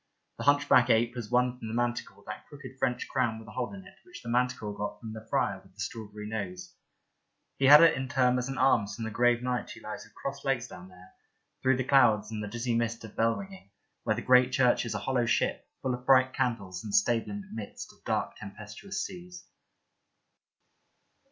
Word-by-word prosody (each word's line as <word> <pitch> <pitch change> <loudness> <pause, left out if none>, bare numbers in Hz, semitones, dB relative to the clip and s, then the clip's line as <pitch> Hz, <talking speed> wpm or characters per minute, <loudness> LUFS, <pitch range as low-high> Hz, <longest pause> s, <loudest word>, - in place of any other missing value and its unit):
The - - -4
hunch 145 0 +4
backed 125 -3 +5
ape 115 +1 +3
has 120 -4 -6
won 125 0 +1
from 110 - -6
the 110 - -4
manticore 120 0 -2
that - - -8
crooked 130 -2 -11
French 125 -1 -1
crown 120 -4 0
with 110 0 -12
a - - -10
hole 125 0 -3
in 195 -1 -10
it 195 0 -16
which 180 - -12
the 115 - -6
manticore 120 -4 0
got 105 0 -4
from 110 0 -7
the 110 0 -10
friar - - 0
with - - -23
the - - -23
strawberry 105 0 -6
nose; 100 -4 -5 0.9
he 135 - +3
had 150 +4 +10
it 165 - +6
in 130 0 -3
turn 125 -2 +3
as 125 +2 -3
an 135 - -4
alms 120 -6 +3
from 115 - -5
the 115 - -4
grave 120 +2 +2
knight 125 -1 -2
who - - -10
lies - - -7
with - - -20
crossed 140 0 -5
legs 135 -3 0
down 90 - -11
there, 90 0 -16 0.5
through 130 -1 +3
the 130 - 0
clouds 115 -6 +4
and 105 -1 -4
the - - -4
dizzy 120 +3 -2
mist 115 0 -1
of 110 - -10
bell 115 0 +2
ringing, 195 - -10 0.3
where 110 - +1
the 120 - -5
great 125 0 +5
church 125 -2 +3
is - - -3
a - - 0
hollow 125 -3 0
ship, 120 - 0 0.2
full 130 - 0
of 125 0 -7
bright 130 -1 +5
candles, 100 -7 -2
and 105 -2 -3
stable 115 +2 +2
in 205 0 -5
the 190 - -14
midst 110 -2 -7
of - - -27
dark - - -1
tempestuous 110 - -6
seas. 180 -1 -10
120 Hz, 220 wpm, -29 LUFS, 110-130 Hz, 0.9 s, had